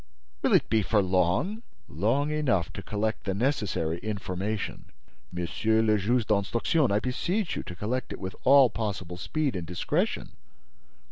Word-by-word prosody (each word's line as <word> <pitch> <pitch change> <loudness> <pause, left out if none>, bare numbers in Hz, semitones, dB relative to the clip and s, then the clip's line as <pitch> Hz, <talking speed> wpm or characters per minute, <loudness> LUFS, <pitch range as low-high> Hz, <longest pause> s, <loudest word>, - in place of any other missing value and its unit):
"Will - - +2
it - - +3
be 110 - +2
for 105 +1 +2
long?" 95 - +1 0.3
"Long 115 - 0
enough 125 - 0
to - - -6
collect 110 +2 -2
the 95 -2 -1
necessary 100 - 0
information." 100 0 -3 0.5
"Monsieur 110 +6 +1
le 110 -1 +4
Juge 115 +4 +1
d'Instruction, 115 - +1
I 100 - +3
beseech 170 - -1
you - - -2
to 85 - -8
collect 115 +8 -3
it - - -6
with 95 -1 -5
all 135 -2 +7
possible 95 -6 -4
speed 140 - -1
and 85 -3 -4
discretion." 150 - -1
110 Hz, 150 wpm, -27 LUFS, 95-130 Hz, 0.5 s, all